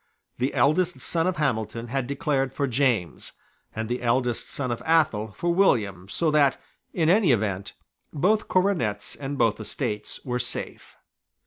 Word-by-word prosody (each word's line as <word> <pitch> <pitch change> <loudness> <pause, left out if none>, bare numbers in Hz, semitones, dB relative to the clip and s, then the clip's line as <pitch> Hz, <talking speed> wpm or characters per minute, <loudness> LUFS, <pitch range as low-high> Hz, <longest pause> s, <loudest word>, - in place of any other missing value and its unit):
The 130 +3 -1
eldest 175 +5 +2
son 165 0 0
of 185 - -1
Hamilton 115 -5 -1
had 135 0 -2
declared 140 -2 -1
for 140 - 0
James, 120 - 0 0.4
and 110 0 -3
the 120 +2 -2
eldest 120 0 0
son 130 -3 -3
of 120 - -3
Athol 140 -10 +2
for 175 0 0
William, 100 - +2
so 160 +8 +1
that, 145 -3 +3 0.3
in 160 -3 0
any 185 -2 +4
event, 100 -4 -1 0.4
both 205 +9 +1
coronets 175 - 0
and 140 0 -5
both 115 -3 +2
estates 105 0 -3
were 125 -1 -1
safe. - - -5
135 Hz, 150 wpm, -25 LUFS, 110-160 Hz, 0.4 s, any